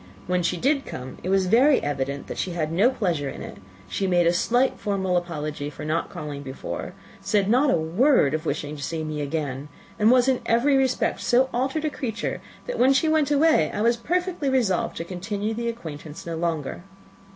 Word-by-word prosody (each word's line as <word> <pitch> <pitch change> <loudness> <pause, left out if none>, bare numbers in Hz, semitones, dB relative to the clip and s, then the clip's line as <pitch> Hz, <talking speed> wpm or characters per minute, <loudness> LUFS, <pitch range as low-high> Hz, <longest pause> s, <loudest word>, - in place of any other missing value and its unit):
When 180 0 +1
she 175 +1 0
did 275 - +1
come, 130 - -8
it 180 - -4
was 195 0 +3
very 255 +9 +5
evident 140 -1 -2
that - - -6
she 180 - -2
had 155 -2 -2
no 195 +9 +4
pleasure 175 - -1
in - - -7
it; - - -9 0.3
she 195 - -2
made 175 -2 +3
a 170 - +4
slight, 245 +8 +1
formal 190 -3 -1
apology 155 -4 -3
for 150 0 -8
not 160 +2 -1
calling 150 -4 -6
before, 130 -1 -6 0.3
said 205 -3 +1
not 255 +7 +4
a - - +3
word 165 - +3
of 155 0 -1
wishing 150 -1 -3
to 145 - -9
see 160 +2 -3
me 155 -1 -3
again, 145 -2 -3 0.3
and 215 +1 +5
was, 250 +1 +5
in 260 -2 +2
every 245 +5 +3
respect, 265 -1 +1
so 260 +2 +3
altered 265 +5 -1
a 305 - 0
creature, 230 -7 -3 0.2
that - - -4
when 260 +2 +5
she 315 +4 +2
went 310 -2 +2
away 295 - +4
I - - -3
was 235 +1 +4
perfectly 350 +4 -1
resolved 235 -9 +1
to - - -3
continue 200 +5 -3
the 235 +1 -2
acquaintance 160 -8 -8
no 170 -1 -4
longer. 160 -2 -2
190 Hz, 205 wpm, -24 LUFS, 155-255 Hz, 0.3 s, very